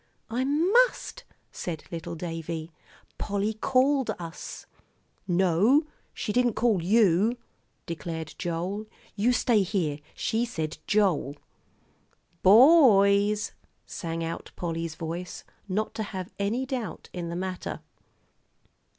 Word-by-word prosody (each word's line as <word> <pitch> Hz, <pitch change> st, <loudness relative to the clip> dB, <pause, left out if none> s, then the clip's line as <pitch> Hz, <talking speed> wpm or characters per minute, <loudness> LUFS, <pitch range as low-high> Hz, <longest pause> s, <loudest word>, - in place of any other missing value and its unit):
"I 245 Hz, +3 st, 0 dB
must," 425 Hz, -, +2 dB, 0.3 s
said 165 Hz, -4 st, -5 dB
little 165 Hz, -1 st, -5 dB
Davie; 165 Hz, -1 st, -5 dB, 0.5 s
"Polly 205 Hz, +1 st, -1 dB
called 265 Hz, +4 st, +2 dB
us." 165 Hz, -1 st, -8 dB, 0.6 s
"No, 190 Hz, -, +4 dB, 0.3 s
she 210 Hz, -, -4 dB
didn't 245 Hz, -1 st, +2 dB
call 220 Hz, -6 st, +2 dB
you," 205 Hz, +3 st, +3 dB, 0.5 s
declared 160 Hz, -2 st, -5 dB
Joel. 180 Hz, +5 st, -3 dB, 0.3 s
"You 225 Hz, +5 st, +2 dB
stay 240 Hz, -3 st, +3 dB
here. 175 Hz, -7 st, -1 dB, 0.2 s
She 225 Hz, +2 st, 0 dB
said 160 Hz, -11 st, -4 dB
'Joel.'" 185 Hz, -9 st, +1 dB, 1.0 s
"Bo 260 Hz, -, +8 dB
oys!" 205 Hz, +2 st, +2 dB, 0.3 s
sang 165 Hz, -2 st, -4 dB
out 165 Hz, 0 st, -5 dB
Polly's 165 Hz, -1 st, -3 dB
voice, 170 Hz, +2 st, -5 dB, 0.3 s
not 215 Hz, +4 st, -1 dB
to -, -, -4 dB
have 185 Hz, -1 st, -6 dB
any 220 Hz, +6 st, 0 dB
doubt 255 Hz, -4 st, -5 dB
in 175 Hz, -2 st, -4 dB
the 170 Hz, -, -4 dB
matter. 185 Hz, 0 st, -4 dB
195 Hz, 110 wpm, -27 LUFS, 170-235 Hz, 1.0 s, Bo